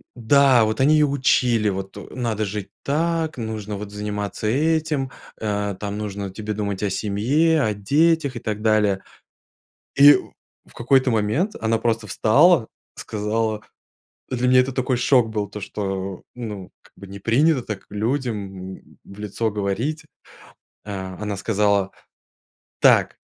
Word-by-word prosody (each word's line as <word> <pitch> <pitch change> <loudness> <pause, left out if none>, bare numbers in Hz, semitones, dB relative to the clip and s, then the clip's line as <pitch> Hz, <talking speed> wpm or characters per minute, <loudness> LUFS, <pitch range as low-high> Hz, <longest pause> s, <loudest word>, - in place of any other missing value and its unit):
да, 130 +1 +4
вот 110 +3 -2
они 145 +3 +5
ее 150 -1 +4
учили 125 -5 +2
вот: 95 0 -5 0.2
"Надо 115 -4 -1
жить 100 -1 -5
так, 160 +1 -1
нужно 110 -2 -4
вот 100 0 -7
заниматься 105 0 -4
этим, 150 0 0 0.3
а, 105 -2 -2
нужно 100 -1 -4
тебе 105 +3 -5
думать 100 -1 -3
о 105 - +1
семье, 125 - +1
о 110 -2 +1
детях". 145 +6 +2
И - - -4
так 105 -1 -4
далее. 105 -3 +2 0.9
И 145 +1 +9 0.5
в - - -20
какой-то 130 +2 +2
момент 115 - 0
она 115 0 0
просто 115 -1 -1
встала, 125 - +4 0.3
сказала 110 0 -2 0.7
Для 125 0 0
меня 130 0 +6
это 130 +1 -1
такой 130 -1 0
шок 125 -1 +3
был, 105 -2 -2
то 105 0 -8
что, 95 -2 -4
ну, 105 -6 -7
как - - -23
бы, 100 - -11
не 100 +1 -9
принято 130 +7 +2
так 105 -4 -6
людям, 105 -5 -3
м, - - -23
в 100 - -14
лицо 105 +2 -2
говорить. 105 +10 -2 0.8
А 95 -3 -6
а - - -8
она 105 -1 -3
сказала: 100 -1 +1 0.9
"Так, - - +4
110 Hz, 145 wpm, -22 LUFS, 100-130 Hz, 0.9 s, И